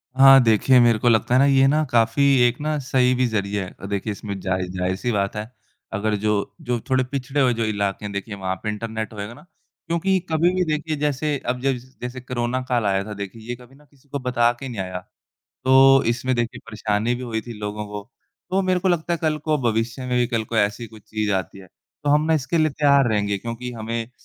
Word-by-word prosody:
हाँ 135 0 +8
देखिए, 120 +3 +4
मेरे 120 -2 +4
को 120 - +3
लगता 115 +1 +2
है 130 - +5
ना 140 - +5
ये 135 -1 +5
ना 150 +3 +2
काफ़ी 115 +3 +3 0.2
एक 120 +1 -2
ना 155 0 -1
सही 130 -2 +2
भी 130 0 +2
ज़रिया 100 -2 -1
है। - - -12
अ, - - -8
देखिए 100 +2 -2
इसमें 100 0 -6
ज़ाहि 95 -1 -2
ज़ाहिर-सी 95 +5 -2
बात 100 -2 -1
है 105 +1 -5 0.4
अगर 105 +1 0
जो 100 -1 0
जो 120 -1 0
थोड़े 130 -1 +3
पिछड़े 135 +2 -2
हुए 125 -2 +3
जो 115 0 -2
इलाके 100 -1 -2
हैं 100 - -4
देखिए 100 +1 -5
वहाँ 95 -1 -3
पे 110 - -2
इंटरनेट 110 +1 -4
होएगा 105 +2 -6
ना 150 - -16 0.4
क्योंकि 185 +3 +1
कभी 165 +3 +2
भी 185 - +2
देखिए 155 0 -2
जैसे 145 0 0
अब 125 +1 -1
जैस 130 -1 -3
जैसे 125 +1 -5
कोरोना 125 0 -2
काल 120 -3 +1
आया 95 -1 +1
था 105 - -6
देखिए 100 +2 -7
ये 120 - -2
कभी 125 +2 -17
ना 150 +2 -21
किसी 140 0 -28
को 140 - -3
बता 125 -2 +2
के 135 - -6
नहीं 115 -5 -4
आया। 95 -1 -5 0.7
तो 135 +1 +6
इसमें 125 +2 0
देखिए 120 -1 -2
परेशानी 110 +1 -1
भी 125 - -6
हुई 115 -3 -3
थी 120 +2 -9
लोगों 105 0 -4
को। 105 0 -6 0.5
तो 190 +1 +2
मेरे 185 -1 +1
को 190 - +1
लगता 175 -1 0
है 170 - 0
कल 155 -1 +1
को 155 -1 +2
भविष्य 115 0 -1
में 125 -1 0
भी 120 - +2
कल 115 -2 -1
को 115 - -4
ऐसी 105 +2 +1
कुछ 110 -1 -15
चीज़ 110 -1 -1
आती 95 0 -3
है। 95 - -13 0.4
तो 145 - +2
हम 150 +1 +4
ना 160 - +3
इसके 155 +3 0
लिए 155 -1 +3
तैयार 140 -2 +3
रहेंगे 105 -2 0
क्योंकि 115 +3 -6
हमें 115 0 -4
120 Hz, 235 wpm, -22 LUFS, 105-135 Hz, 0.7 s, हाँ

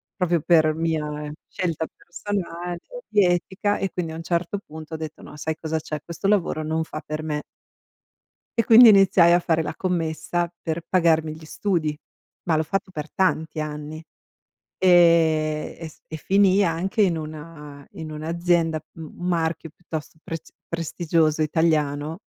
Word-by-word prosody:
proprio 175 -3 +1
per 155 -1 +4
mia 150 -2 -2 0.2
scelta 165 -3 -2
personale, 175 -2 -4 0.3
di 205 -2 +4
etica, 190 +3 0
e 195 - -2
quindi 170 -3 -3
a - - -6
un 165 - -7
certo 175 +3 -1
punto 160 -3 -11
ho - - -2
detto: 155 -1 -7
"No, - - -11
sai 160 +1 -3
cosa 160 0 -2
c'è? 155 0 -5
Questo 170 +3 -4
lavoro 185 -6 +1
non 160 +1 -1
fa 155 -1 -7
per 155 +1 -4
me". 150 -1 -2 1.2
E 230 - +4
quindi 230 +1 +9
iniziai 195 -4 +6
a - - +6
fare 165 -2 +1
la - - -4
commessa 175 -1 -1
per 160 0 -2
pagarmi 160 -3 +2
gli 155 0 -12
studi, 160 -3 -1 0.5
ma 165 -2 +2
l'ho 155 - +2
fatto 190 +4 -2
per 155 -3 -7
tanti 160 -4 0
anni. 155 +1 -5 0.7
Ehm, 165 -4 +4
e 165 - -5
s 155 - -19
e 160 - -6
finii 195 +3 +4
anche 185 +5 -1
in 185 -5 +4
una 150 -2 -9
in 160 -1 -7
un'azienda, 165 +1 0 0.2
m 165 - -6 0.2
marchio 165 -2 -1
piuttosto 160 -1 -8
prest 165 -1 -7 0.2
prestigioso 165 -1 0
italiano, 155 -1 +1
165 Hz, 155 wpm, -24 LUFS, 155-175 Hz, 1.2 s, quindi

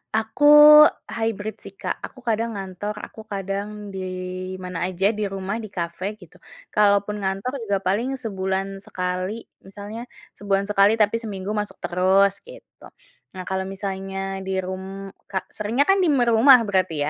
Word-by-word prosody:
Aku 220 +6 0 0.7
hybrid 220 -2 -3
sih, 195 - -12
Kak, - - -4
aku 260 - -13
kadang 230 -1 -1
ngantor, 195 +2 -5
aku 220 - -12
kadang 200 +1 -5
di 190 - -5 0.6
mana 180 -1 -4
aja, 190 +3 +1
di 215 -1 -4
rumah, 195 +3 -4
di 220 - -6
kafe 185 +1 -4
gitu. 180 -6 -18 0.3
Kalaupun 205 0 +2
ngantor 195 +5 -2 0.2
juga 200 -1 +1
paling 230 +8 0
sebulan 195 -4 -3
sekali, 185 +3 -4 0.2
misalnya 205 +4 -8 0.3
sebulan 200 -1 0
sekali 205 +2 +5
tapi 215 0 +2
seminggu 205 -3 -5
masuk 210 -1 -3
terus 190 +2 +3
gitu. - - -14 0.5
Nah 185 - -5
kalau 190 +1 -3
misalnya 195 0 -4
di 190 - -1
rum 190 +1 -7 0.2
ka 190 -1 -3
seringnya 225 +7 0
kan 390 +4 +3
di 365 - +3
m 275 -5 +3
rumah 235 +2 +6
berarti 190 -6 0
200 Hz, 150 wpm, -23 LUFS, 190-220 Hz, 0.7 s, rumah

